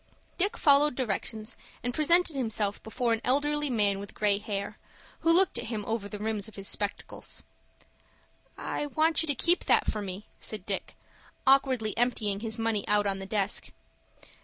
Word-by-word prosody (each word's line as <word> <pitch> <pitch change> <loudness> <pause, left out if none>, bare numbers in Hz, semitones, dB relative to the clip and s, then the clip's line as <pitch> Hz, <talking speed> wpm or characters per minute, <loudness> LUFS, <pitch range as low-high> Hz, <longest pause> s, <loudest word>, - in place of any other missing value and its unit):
Dick 410 +6 +3
followed 285 -1 +4
directions, 220 -1 -3 0.3
and 245 +1 -2
presented 335 +2 +4
himself 220 -5 -1
before 235 +1 -1
an 225 - -2
elderly 295 +3 +1
man 205 -5 +2
with 200 0 -9
gray 205 -1 +2
hair, 200 -1 -4 0.4
who 330 - +3
looked 355 -7 +5
at 235 - -4
him 220 -3 -4
over 220 -2 -3
the 210 - -6
rims 210 -1 -2
of 220 - -14
his 195 -1 -6
spectacles. 205 -1 -4 1.1
"I 295 - -3
want 315 +2 +2
you 325 - -2
to 285 - +1
keep 345 +7 +2
that - - +4
for 215 - -1
me," 195 +1 -6
said 210 -4 -3
Dick, 195 -2 -3 0.5
awkwardly 260 -5 +4
emptying 220 -5 +1
his 220 +1 -4
money 225 -3 0
out 205 0 +3
on 195 -1 -1
the 195 - -7
desk. 200 -1 -1
225 Hz, 170 wpm, -29 LUFS, 205-275 Hz, 1.1 s, looked